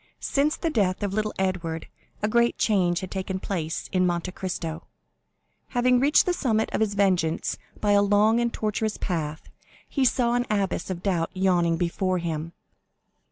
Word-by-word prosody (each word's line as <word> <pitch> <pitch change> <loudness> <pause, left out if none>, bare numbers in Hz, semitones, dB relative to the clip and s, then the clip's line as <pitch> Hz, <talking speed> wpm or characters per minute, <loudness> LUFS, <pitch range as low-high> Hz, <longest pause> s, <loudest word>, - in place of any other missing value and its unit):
Since 295 +3 +1
the 330 - -1
death 200 -6 +1
of 200 -1 -1
little 215 0 0
Edward 180 -4 -2 0.4
a - - +3
great 235 +2 +2
change 180 -5 +2
had 185 - -7
taken 190 0 -3
place 165 -5 -3
in 185 -1 +2
Monte 175 +1 -1
Cristo. 170 -4 -5 0.9
Having 250 0 +4
reached 285 +4 +4
the 360 - +1
summit 225 -9 0
of - - 0
his 210 -2 +1
vengeance 180 -5 +1 0.2
by 210 - +1
a 200 0 +5
long 205 +3 +4
and 235 0 +1
tortuous 215 0 -2
path, 155 -4 -4 0.4
he 275 - 0
saw 240 -1 +2
an 245 0 0
abyss 200 -3 -1
of 180 -2 -4
doubt 175 -4 0
yawning 175 -3 +2
before 185 +2 0
him. 165 -1 -4
190 Hz, 165 wpm, -25 LUFS, 175-220 Hz, 0.9 s, a